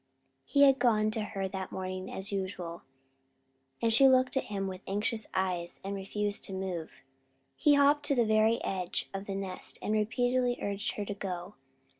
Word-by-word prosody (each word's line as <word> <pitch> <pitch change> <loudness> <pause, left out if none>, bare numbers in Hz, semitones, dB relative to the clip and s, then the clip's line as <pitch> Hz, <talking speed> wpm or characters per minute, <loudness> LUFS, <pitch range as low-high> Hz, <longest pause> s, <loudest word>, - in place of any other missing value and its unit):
He 285 -1 +4
had 270 -1 +6
gone 215 -3 +3
to 220 - -2
her 195 -2 -3
that 190 -1 -5
morning 185 0 -4
as 190 +2 -4
usual, 185 -3 -4 1.0
and 230 -1 +3
she 270 +4 +7
looked 260 0 +4
at 265 - 0
him 200 -1 -3
with 185 0 -6
anxious 215 +2 -1
eyes 180 -2 -1
and 195 +1 -3
refused 205 +1 -2
to 195 - -6
move. 185 -4 -4 0.6
He 295 -1 +4
had 285 - +5
hopped 290 +1 +4
to 280 - +2
the 240 -2 +3
very 220 +1 +3
edge 185 -2 -2
of 195 +1 -5
the 195 - -3
nest 195 -2 -3
and 210 - -2
repeatedly 245 +3 +1
urged 200 0 -1
her 205 - -4
to 205 - -3
go. 185 -1 -5
205 Hz, 185 wpm, -31 LUFS, 190-230 Hz, 1.0 s, she